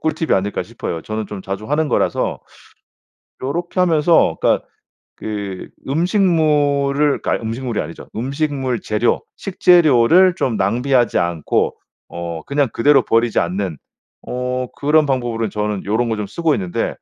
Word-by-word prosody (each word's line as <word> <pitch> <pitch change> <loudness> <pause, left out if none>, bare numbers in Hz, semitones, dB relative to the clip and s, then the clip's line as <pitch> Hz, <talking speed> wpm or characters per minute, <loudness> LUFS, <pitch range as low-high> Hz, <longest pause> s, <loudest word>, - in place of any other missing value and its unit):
꿀팁이 160 0 -1
아닐까 100 +2 0
싶어요. 80 - -6
저는 110 0 -4
좀 100 -2 -7
자주 95 +3 -5
하는 150 +3 0
거라서. - - 0 1.0
요렇게 175 +7 -3
하면서 165 -2 +3
그러니까 - - +1 0.5
그 100 -3 -5 0.2
음식물을 150 -4 +2
그러니까 - - -1
음식물이 115 +1 -3
아니죠. 80 +2 -8
음식물 135 0 -2
재료, 110 +2 0
식재료를 175 - +4
좀 120 -10 0
낭비하지 120 +5 +1
않고 85 -3 0 0.3
어 85 -2 -6
그냥 140 -1 +1
그대로 140 +3 +4
버리지 115 -1 +1
않는 90 -2 -2 0.5
어 125 0 -2
그런 150 +1 +2
방법으로는 120 -4 -1
저는 105 -1 -3
요런 115 +3 +1
거 110 - 0
좀 105 -1 -3
쓰고 160 +7 0
있는데 90 -3 -2
125 Hz, 320 characters per minute, -19 LUFS, 105-150 Hz, 1.0 s, 식재료를